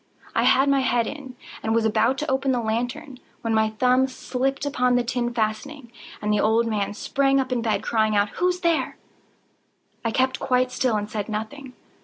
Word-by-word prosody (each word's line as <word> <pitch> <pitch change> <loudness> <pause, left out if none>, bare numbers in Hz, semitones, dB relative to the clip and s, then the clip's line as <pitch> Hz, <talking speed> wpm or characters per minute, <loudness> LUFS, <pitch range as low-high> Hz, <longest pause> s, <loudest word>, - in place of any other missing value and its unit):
I - - +2
had 270 +2 +4
my 275 -1 +3
head 245 -3 +1
in, 270 -2 -7 0.3
and 220 +1 0
was 230 -1 +2
about 225 +4 +2
to 300 - -3
open 265 0 +1
the 250 - +1
lantern, 245 +5 -3 0.2
when 230 -1 -1
my 220 0 +3
thumb 250 +4 +2
slipped 270 +1 -2
upon 250 -3 +1
the 245 - +2
tin 240 0 -1
fastening, 235 +4 -3 0.3
and 210 0 +1
the 210 - +2
old 225 +3 +3
man 210 -2 -2
sprang 275 +4 +1
up 265 -1 -2
in 245 -2 0
bed, 220 -2 0
crying 215 -2 +1
out—"Who's 355 - +1
there?" 335 -2 0 1.1
I 230 - 0
kept 260 +3 +1
quite 255 -1 +1
still 250 -3 0
and 210 0 -3
said 210 0 -4
nothing. 240 +5 -5
245 Hz, 190 wpm, -24 LUFS, 220-270 Hz, 1.1 s, had